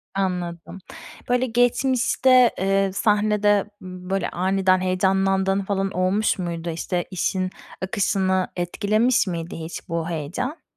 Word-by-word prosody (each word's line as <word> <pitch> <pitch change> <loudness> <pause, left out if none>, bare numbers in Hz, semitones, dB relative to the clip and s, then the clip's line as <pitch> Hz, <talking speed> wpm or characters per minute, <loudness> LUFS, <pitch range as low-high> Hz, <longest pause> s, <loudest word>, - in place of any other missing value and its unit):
Anladım. 180 -2 -3 0.5
Böyle 250 +1 +2
geçmişte, 250 +1 +3
eee, 195 +1 +1
sahnede, 210 -1 +2 0.2
ımm, 185 0 -9
böyle 195 0 -1
aniden 185 0 +1
heyecanlandığın 190 +1 +1
falan 195 0 -2
olmuş 190 +4 +1
muydu? 170 -1 -4
İşte, 175 +2 -2
işin 185 +1 -1 0.3
akışını 190 -1 0
etkilemiş 215 +7 +1
miydi 170 -2 -4
hiç 165 +1 -7
bu 165 0 -2
heyecan? 175 - -4
190 Hz, 110 wpm, -23 LUFS, 180-210 Hz, 0.5 s, geçmişte